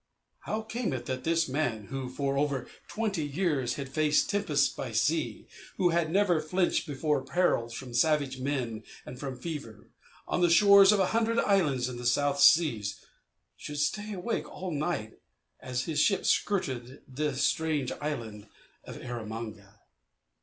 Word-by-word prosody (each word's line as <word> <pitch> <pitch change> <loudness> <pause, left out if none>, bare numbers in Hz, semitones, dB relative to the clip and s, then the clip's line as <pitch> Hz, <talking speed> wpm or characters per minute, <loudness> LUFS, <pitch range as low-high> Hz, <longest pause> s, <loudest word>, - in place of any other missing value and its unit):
How 220 +1 -2
came 220 - -3
it 120 -2 -4
that 130 -1 -4
this 165 0 +2
man, 130 -6 -1
who 135 -2 -4
for 135 +1 -2
over 140 -3 -1 0.2
twenty 205 -7 -2
years 145 -5 -1
had 140 -1 -5
faced 150 +3 +2
tempests 155 -9 +2
by 120 -4 -6
sea, 150 +8 0 0.3
who 180 - +3
had 170 -1 +1
never 180 -3 +2
flinched 175 +3 0
before 145 0 0
perils 130 -7 0
from 125 -1 -8
savage 140 0 +1
men 130 -5 -2 0.2
and 125 0 -9
from 135 -2 -5
fever, 140 -9 -7 0.4
on - - -1
the 175 - +4
shores 200 +2 +7
of 210 - +3
a 190 - +4
hundred 230 0 +1
islands 150 - +2
in 125 -1 -6
the 120 0 -2
South 140 +3 +1
Seas, 115 -11 +4 0.5
should 150 - -7
stay 205 +8 -1
awake 200 +5 -3
all 185 -1 -6
night 145 -8 -3 0.4
as 125 -1 -3
his 155 -1 -2
ship 195 +2 +2
skirted 130 -10 -1
the 145 +1 -2
strange 150 -1 0
island 115 -8 -5 0.4
of - - -9
Erromanga? 110 -4 -7
145 Hz, 155 wpm, -29 LUFS, 125-175 Hz, 0.5 s, shores